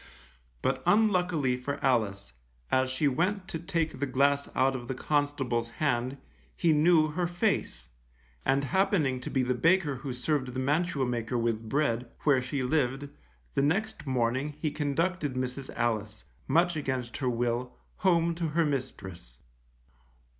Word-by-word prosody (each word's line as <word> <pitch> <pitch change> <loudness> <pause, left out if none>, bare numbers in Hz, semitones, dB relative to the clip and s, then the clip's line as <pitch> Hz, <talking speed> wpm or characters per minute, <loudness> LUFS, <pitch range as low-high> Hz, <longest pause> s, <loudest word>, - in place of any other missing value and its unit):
But - - 0
unluckily 180 - +3
for 140 +3 -4
Alice, 100 - 0 0.4
as 130 0 +3
she 130 +3 +1
went 185 +8 0
to 165 - -3
take 165 -3 -2
the 140 - 0
glass 140 +2 +2
out 135 +1 +3
of 120 -2 -6
the 130 - -3
constable's 135 -5 0
hand, 130 0 -1 0.4
he 165 -2 +3
knew 155 0 +4
her 175 +3 -1
face, 175 - -1 0.5
and 135 +1 +2
happening 145 -5 +1
to - - -5
be 130 - +1
the 125 0 +1
baker 155 +2 +2
who 135 +1 -5
served 130 0 -1
the - - -1
mantua 150 +1 +1
maker 120 0 -2
with 115 -1 -1
bread, 125 -4 0
where 140 -4 +3
she 130 +2 -2
lived, 135 0 0 0.4
the - - +2
next 185 +5 -1
morning 130 +3 0
he 155 -1 -1
conducted 150 0 -1
Mrs. 130 +1 -3
Alice, 110 -3 -2 0.2
much 175 +1 +3
against 130 -5 -3
her 130 -3 0
will, 120 +1 -1 0.2
home 170 -3 +3
to 165 0 -2
her 165 +2 +1
mistress. 95 - -5
140 Hz, 150 wpm, -29 LUFS, 125-160 Hz, 0.5 s, knew